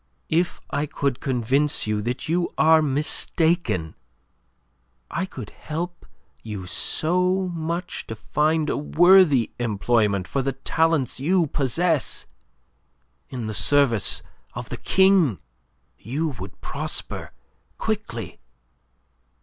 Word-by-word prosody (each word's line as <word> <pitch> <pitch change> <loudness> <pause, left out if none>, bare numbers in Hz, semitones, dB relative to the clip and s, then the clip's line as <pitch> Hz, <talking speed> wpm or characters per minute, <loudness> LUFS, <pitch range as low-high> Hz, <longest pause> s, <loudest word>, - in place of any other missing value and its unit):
"If 170 +2 0
I 145 +2 -1
could 140 -3 -2
convince 135 +3 +1
you 105 -1 -1
that 120 +8 -4
you 170 +2 0
are 160 0 +5
mistaken! 150 - +1 1.2
I 185 +4 -2
could 125 - -9
help 170 +3 -6 0.3
you 105 -4 -6
so 180 - 0
much 170 +2 -4
to 110 - -5
find 155 +7 0
a - - -1
worthy 165 - +5
employment 105 -4 +1
for 140 - -1
the 135 +1 -1
talents 155 +1 0
you 170 +5 +2
possess. 150 +3 0 1.0
In 125 -4 -5
the 110 - -4
service 120 -1 +3 0.3
of - - -6
the - - -5
King 190 - +3 0.6
you 145 +9 -2
would 95 -7 -9
prosper - - -4 0.5
quickly. 120 - -4
145 Hz, 110 wpm, -23 LUFS, 120-170 Hz, 1.2 s, are